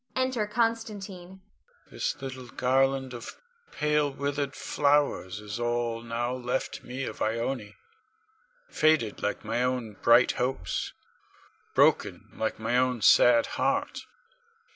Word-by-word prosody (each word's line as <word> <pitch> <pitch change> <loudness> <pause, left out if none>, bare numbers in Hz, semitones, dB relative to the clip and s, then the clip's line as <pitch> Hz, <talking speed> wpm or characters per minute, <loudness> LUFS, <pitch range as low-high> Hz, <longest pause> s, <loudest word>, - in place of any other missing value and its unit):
Enter_ 255 -5 0
Constantine.] 205 -5 -3 0.5
Con. - - -28
This - - -2
little 130 -2 -7
garland 135 +1 +1
of 120 -2 -9 0.3
pale, 150 -1 +1
withered 140 0 -3
flowers 140 -10 +1
is 105 +2 -6
all 120 -1 -1
now 120 +1 -2
left 125 0 -3
me 130 +2 -5
of 110 - -6
Ione, 115 -1 -2 0.9
faded 155 - +2
like 105 - -2
my 115 +3 -1
own 125 -3 -1
bright 120 +2 +6
hopes, 130 +2 -2 0.8
broken - - +2
like 110 - -2
my 115 +3 0
own 125 -3 0
sad 120 -1 +6 0.2
heart. 280 +1 -1
130 Hz, 120 wpm, -28 LUFS, 115-150 Hz, 0.9 s, bright